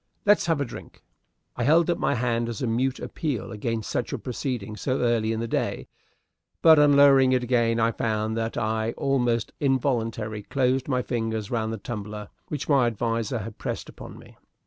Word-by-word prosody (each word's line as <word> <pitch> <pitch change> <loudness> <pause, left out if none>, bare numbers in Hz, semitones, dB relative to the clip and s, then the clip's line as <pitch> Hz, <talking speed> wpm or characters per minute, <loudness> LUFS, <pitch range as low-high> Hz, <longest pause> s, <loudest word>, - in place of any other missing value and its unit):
"Let's 205 -3 +4
have 165 -3 +2
a 140 - 0
drink!" 120 - -11 0.5
I 120 - -2
held 160 +6 +4
up 170 -1 +1
my - - +1
hand 120 -1 0
as 115 0 -5
a - - +2
mute 125 +3 0
appeal 140 -7 -4
against 110 0 -3
such - - -2
a - - -2
proceeding 120 -4 -4
so 130 +4 -1
early 115 -2 +1
in 115 0 -2
the 115 - -2
day; - - -2 0.8
but 160 -2 +8
on 145 -1 +5
lowering 135 -2 +6
it 125 -1 +1
again 120 -2 +2
I 115 0 +3
found 110 -1 -1
that 115 +1 -2
I 110 0 -1
almost 120 -4 0
involuntarily 115 -6 0
closed 130 +3 0
my 125 -3 0
fingers 110 -3 -3
round 110 -2 -1
the 115 - -3
tumbler 105 -1 -6 0.2
which 145 -3 -4
my 135 -5 +4
adviser 115 +1 -1
had 110 0 -7
pressed - - -4
upon - - -11
me. - - -16
120 Hz, 190 wpm, -25 LUFS, 110-130 Hz, 0.8 s, but